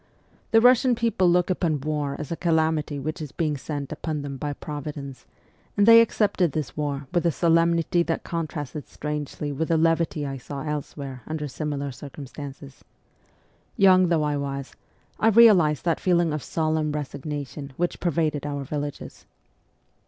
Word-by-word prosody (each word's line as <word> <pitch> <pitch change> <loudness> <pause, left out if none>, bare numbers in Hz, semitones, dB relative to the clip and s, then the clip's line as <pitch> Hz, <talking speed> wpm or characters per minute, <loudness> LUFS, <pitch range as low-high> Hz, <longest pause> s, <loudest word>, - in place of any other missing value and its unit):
The 225 - +5
Russian 250 +1 +5
people 225 -6 +2
look 180 +1 +3
upon 165 -5 0
war 145 -1 -2
as 150 -1 -6
a - - 0
calamity 160 -3 +1
which 155 +5 -4
is 150 -4 -6
being 155 +1 -1
sent 140 0 -5
upon 155 -1 -3
them 140 -1 -5
by 145 +2 -3
Providence, 145 -3 -7 0.5
and 205 - +5
they 230 +1 +9
accepted 200 -8 +1
this 155 -4 -3
war 145 -2 -3
with 175 - +2
a 170 - +3
solem 165 +1 +3
nity 170 +1 +1
that 165 - -1
contrasted 155 -3 -4
strangely 150 0 -4
with 155 +3 -2
the 165 - +2
levity 165 -2 +1
I 135 -1 -4
saw 140 +2 -7
elsewhere 140 -3 -5
under 155 -1 -3
similar 140 0 -3
circumstances. 140 0 -10 0.9
Young 185 -2 +6
though 165 -3 +2
I 150 -1 0
was, 140 -1 -4 0.5
I 220 - +3
realized 195 - +6
that 165 -2 +1
feeling 175 -3 +2
of 150 - -2
solemn 155 -1 -1
resignation 145 -1 -5
which 175 0 -1
pervaded 155 -4 0
our 145 -1 -3
villages. 145 +1 -6
150 Hz, 160 wpm, -25 LUFS, 145-170 Hz, 0.9 s, they